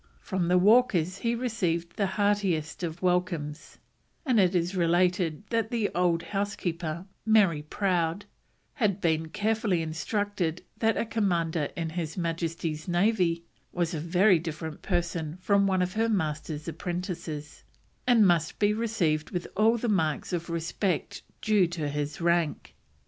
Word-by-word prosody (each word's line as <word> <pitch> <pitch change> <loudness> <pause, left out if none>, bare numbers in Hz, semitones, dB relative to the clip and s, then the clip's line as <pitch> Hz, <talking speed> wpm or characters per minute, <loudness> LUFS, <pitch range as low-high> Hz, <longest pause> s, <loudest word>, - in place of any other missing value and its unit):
From 185 -3 -2
the 180 +1 +4
Walkers 195 -3 +4
he 235 +2 0
received 180 -9 -1
the 200 - +1
heartiest 195 -7 +1
of 170 0 -4
welcomes, 175 -4 -1 0.5
and 250 -6 +3
it 185 -1 +3
is 175 +2 0
related 175 0 +2
that 230 -1 +1
the 230 -4 0
old 170 -2 +2
housekeeper, 175 -4 -3 0.2
Mary 200 -9 +4
Prowd, 175 +2 -1 0.5
had 210 -9 0
been 160 -3 +1
carefully 210 -2 0
instructed 180 +1 -2 0.2
that 225 -1 +2
a - - 0
Commander 170 -8 0
in 165 -1 -3
His 165 -1 -4
Majesty's 165 -2 -3
Navy 175 -2 +1 0.3
was 175 -1 -1
a 160 - -2
very 180 +3 +4
different 160 -1 -6
person 175 -3 -2
from 200 +1 +3
one 185 -1 +2
of 180 +1 -3
her 225 +1 +1
master's 155 -5 -2
apprentices, 170 -3 -5 0.4
and 235 -4 +6
must 170 -4 +2
be 205 0 +3
received 205 -9 0
with 175 -1 -3
all 225 +3 +4
the 235 - -2
marks 170 -6 0
of 170 0 -2
respect 170 +2 -2 0.2
due 210 -4 +4
to 165 -3 -3
his 145 0 -3
rank. 170 -2 0
175 Hz, 145 wpm, -28 LUFS, 165-205 Hz, 0.5 s, and